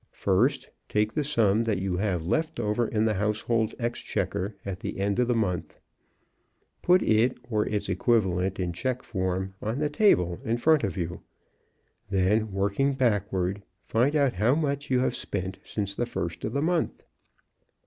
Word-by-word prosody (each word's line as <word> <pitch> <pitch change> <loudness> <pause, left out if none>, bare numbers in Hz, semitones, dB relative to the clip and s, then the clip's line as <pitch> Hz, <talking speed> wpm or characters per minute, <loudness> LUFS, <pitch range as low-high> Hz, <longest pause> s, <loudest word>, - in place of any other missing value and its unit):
First - - +2 0.2
take 105 +1 +1
the 150 - 0
sum 115 -6 +2
that 110 -4 +1
you 95 -1 -1
have 90 -4 -1
left 155 - -1
over 105 +2 0
in 110 0 +1
the 110 - +2
household 105 +2 0
exchequer 105 -4 -2
at 95 -2 -4
the - - -5
end 100 +2 0
of 125 - +3
the 120 - +2
mouth. 90 -7 -2 1.0
Put 180 +1 +4
it, 115 +3 +3
or 105 -1 +1
its 105 -1 -2
equivalent 95 -2 +1
in 90 -2 -1
check 125 +8 -2
form, 95 -1 -2
on 110 +4 -2
the 150 0 0
table 90 - +3
in 115 +1 0
front 155 +3 +3
of 100 -1 -2
you. 85 -1 -3 0.9
Then, 100 +3 +2
working 100 +8 +1
backward, 105 -6 0 0.2
find 120 +9 +1
out 140 -4 +3
how 110 +9 +2
much 145 -2 -1
you 130 -1 +3
have - - 0
spent 95 -1 -4
since 100 -2 -3
the 120 +4 -2
first 85 -8 -4
of 110 - -3
the 140 +1 0
month. 170 0 -1
105 Hz, 170 wpm, -27 LUFS, 95-125 Hz, 1.0 s, Put